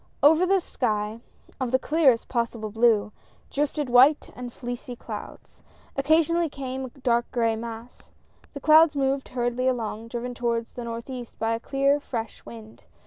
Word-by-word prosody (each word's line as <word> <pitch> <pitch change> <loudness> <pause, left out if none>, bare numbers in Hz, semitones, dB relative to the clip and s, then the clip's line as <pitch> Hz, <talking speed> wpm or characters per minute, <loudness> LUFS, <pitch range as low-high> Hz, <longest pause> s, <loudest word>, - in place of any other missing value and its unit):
Over 320 +5 +6
the 390 +1 +4
sky 215 -8 -2 0.2
— - - -21
of 255 - 0
the 260 - +3
clearest 275 -4 +2
possible 230 -3 -2
blue 225 -2 +3 0.2
— - - -33
drifted 295 0 -1
white 255 +5 +5
and 245 -1 -7
fleecy 245 0 -6
clouds. - - -9 0.3
Occasionally 325 +4 +2
came 265 -2 -5
a - - -7
dark 240 -2 0
gray 230 -2 +1
mass. 230 +1 -9 0.4
The 280 - -7
clouds 310 +1 +6
moved 270 0 0
hurriedl}^ 250 +1 0
along, 225 -2 -3
driven 240 +1 -4
towards 235 -1 -2
the 245 - -6
northeast 235 +1 -7
by 225 0 0
the - - -5
clear 275 +1 +2
fresh 230 -5 -6
wind. 115 -1 -12
245 Hz, 160 wpm, -25 LUFS, 230-275 Hz, 0.4 s, Over